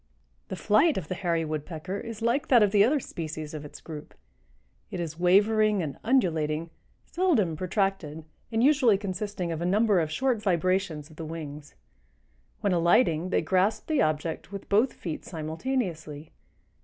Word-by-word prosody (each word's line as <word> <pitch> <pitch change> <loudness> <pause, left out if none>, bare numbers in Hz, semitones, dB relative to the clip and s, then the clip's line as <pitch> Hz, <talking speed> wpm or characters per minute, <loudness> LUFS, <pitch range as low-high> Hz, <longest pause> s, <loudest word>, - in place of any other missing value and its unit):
The - - -5
flight 215 - +3
of 175 -5 -5
the - - -1
Hairy 170 -3 -1
Woodpecker 155 +5 -4
is 230 -1 -7
like 240 +5 +1
that 240 -5 +6
of 205 - +2
the 205 -1 +5
other 280 +7 +3
species 155 - -6
of 155 -1 -6
its 150 - -10
group. 150 -2 -9 0.7
It 185 - -5
is 165 -1 -5
wavering 205 +2 +4
and 145 -3 -6
undulating, 165 - +1 0.3
seldom 300 - +1
protracted 185 -4 -2 0.3
and 225 +1 +1
usually 265 -7 +5
consisting 195 -2 -4
of 165 0 -4
a - - -1
number 205 0 +3
of 160 -2 0
short 250 +4 0
vibrations 180 -5 0
of 155 - -16
the 165 - -6
wings. 150 -2 -8 0.9
When 200 -2 +1
alighting, 170 0 +3
they - - +1
grasp 190 +6 +1
the 310 -3 +1
object 155 +4 -1
with 200 -1 -7
both 220 +6 +3
feet 165 -4 -6
simultaneously. 160 - -4
185 Hz, 160 wpm, -27 LUFS, 160-215 Hz, 0.9 s, that